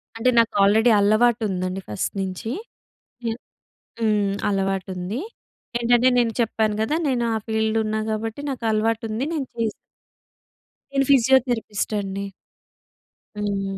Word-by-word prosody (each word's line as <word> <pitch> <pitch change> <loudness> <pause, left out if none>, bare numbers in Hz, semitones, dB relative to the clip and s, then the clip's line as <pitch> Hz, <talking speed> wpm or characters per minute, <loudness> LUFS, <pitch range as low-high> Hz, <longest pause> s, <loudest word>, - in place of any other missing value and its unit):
అంటే, 225 +3 +2
నాకు 230 -1 +2
already 220 +4 +5
అలవాటుందండి 205 -4 +2
first 105 - -2
నించీ.ఎ 225 - -6 1.2
హ్మ్. 210 -3 +2 0.2
అలవాటుంది. 195 +1 -2 0.6
ఏంటంటే 240 +1 +4
నేను 235 -2 +2
చెప్పాను 220 -2 +1
కదా! 220 +7 0
నేను 245 -3 +1
ఆ - - +1
ఫీల్డ్ 220 0 0
ఉన్నా 215 0 -1
గాబట్టి, 220 +3 -3
నాకలవాటుంది. 225 -1 -1
నేను 285 -4 -2
చే‌‌స్ 230 -2 -1 1.2
నేను 275 0 +2
ఫిజియోథెరపిస్ట్ 245 -5 +3
అండి. 200 0 -4 1.1
హ్మ్. 195 -2 -2
220 Hz, 105 wpm, -23 LUFS, 200-235 Hz, 1.2 s, already